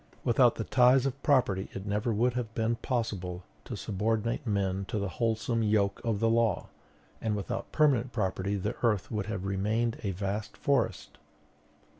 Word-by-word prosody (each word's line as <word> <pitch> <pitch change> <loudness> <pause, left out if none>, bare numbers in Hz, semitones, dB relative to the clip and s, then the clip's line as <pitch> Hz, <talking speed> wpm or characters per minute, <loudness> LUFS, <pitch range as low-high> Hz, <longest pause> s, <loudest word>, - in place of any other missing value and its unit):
"Without 120 0 +4
the 115 - -3
ties 125 +3 +4
of 135 +1 -3
property 105 -9 +2
it 95 - -6
never 105 +3 0
would 120 +3 +2
have 120 -3 -3
been 115 +1 +1
possible 100 -9 -3 0.2
to - - -5
subordinate 110 +5 -1
men 100 -2 0
to 105 - -3
the 100 -1 -1
wholesome 115 0 +1
yoke 105 -2 +1
of 115 -3 0
the 115 - +2
law; 115 -4 +1 0.5
and 110 -2 0
without 115 +3 -4
permanent 135 -5 +3
property 95 -2 -1
the 105 +4 -2
earth 110 -5 +1
would 105 -3 -2
have 100 -3 -3
remained 110 +4 0
a 105 - -2
vast 100 +3 -3
forest. - - 0
110 Hz, 165 wpm, -29 LUFS, 100-120 Hz, 0.5 s, Without